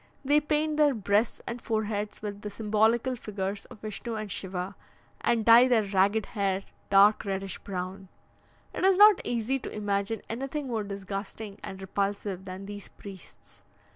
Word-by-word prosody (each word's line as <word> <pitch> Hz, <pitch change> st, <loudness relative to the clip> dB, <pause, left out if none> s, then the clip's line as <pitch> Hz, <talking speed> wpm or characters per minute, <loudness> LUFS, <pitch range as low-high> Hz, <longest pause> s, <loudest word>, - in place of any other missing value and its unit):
They 290 Hz, +2 st, +5 dB
paint 300 Hz, 0 st, 0 dB
their 295 Hz, -3 st, +4 dB
breasts 205 Hz, +1 st, +1 dB
and 240 Hz, 0 st, -5 dB
foreheads 215 Hz, -2 st, -2 dB
with 205 Hz, -1 st, -5 dB
the 210 Hz, -, -5 dB
symbolical 220 Hz, +4 st, +1 dB
figures 200 Hz, -3 st, -4 dB
of 215 Hz, -, -14 dB
Vishnu 220 Hz, +2 st, -5 dB
and 215 Hz, -2 st, -5 dB
Shiva, 185 Hz, +1 st, -3 dB, 0.5 s
and 230 Hz, -2 st, +1 dB
dye 235 Hz, +2 st, +8 dB
their 235 Hz, -4 st, +3 dB
ragged 200 Hz, +2 st, +2 dB
hair 195 Hz, -3 st, -1 dB, 0.3 s
dark 200 Hz, +2 st, +6 dB
reddish 195 Hz, -1 st, -3 dB
brown. 190 Hz, 0 st, -5 dB, 0.7 s
It -, -, -4 dB
is 380 Hz, -1 st, +5 dB
not 415 Hz, -1 st, +8 dB
easy 245 Hz, +3 st, -1 dB
to -, -, -6 dB
imagine 205 Hz, +1 st, -2 dB
anything 270 Hz, +5 st, -4 dB
more 230 Hz, -4 st, -2 dB
disgusting 200 Hz, +1 st, -6 dB
and 190 Hz, -, -7 dB
repulsive 195 Hz, 0 st, -3 dB
than 190 Hz, +1 st, -7 dB
these 205 Hz, 0 st, -8 dB
priests. 195 Hz, -3 st, -13 dB
210 Hz, 155 wpm, -28 LUFS, 195-235 Hz, 0.7 s, dye